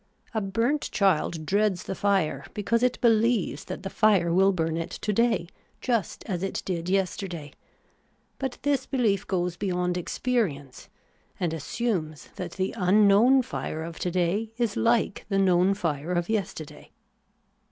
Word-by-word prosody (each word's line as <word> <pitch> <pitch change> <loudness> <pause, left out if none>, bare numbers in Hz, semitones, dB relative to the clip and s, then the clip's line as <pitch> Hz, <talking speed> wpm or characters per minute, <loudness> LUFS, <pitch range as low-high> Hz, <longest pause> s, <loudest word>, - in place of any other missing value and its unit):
A 220 - 0
burnt 230 +9 0
child 170 -4 +1
dreads 200 +1 +1
the - - -4
fire, 190 -9 0
because 230 +3 +1
it 250 0 +1
beheves 225 - +2
that - - -6
the 195 - -3
fire 190 -6 +3
will 195 +2 +5
burn 165 -3 -1
it 165 +1 -3
to 210 - -3
day 225 -6 +2 0.3
just 230 -8 -1
as 180 -5 -3
it 195 - -3
did 175 -2 -3
yesterday; 185 -5 -2 0.9
but 265 -2 -3
this 285 -1 +1
behef 215 -7 +1
goes 180 -2 -1
beyond 180 -2 -1
experience, 175 - -2 0.5
and 175 -3 -1
assumes 165 - -3
that 180 -2 -5
the 190 0 -2
unknown 210 +7 +5
fire 160 -8 -4
of 165 0 -7
to 180 - -1
day 185 +5 0
is 235 -4 0
hke 230 -3 +1
the 195 - +1
known 190 0 +4
fire 165 -3 -2
of 175 +1 -1
yester 200 -7 -2
day. - - -15
195 Hz, 150 wpm, -26 LUFS, 170-220 Hz, 0.9 s, will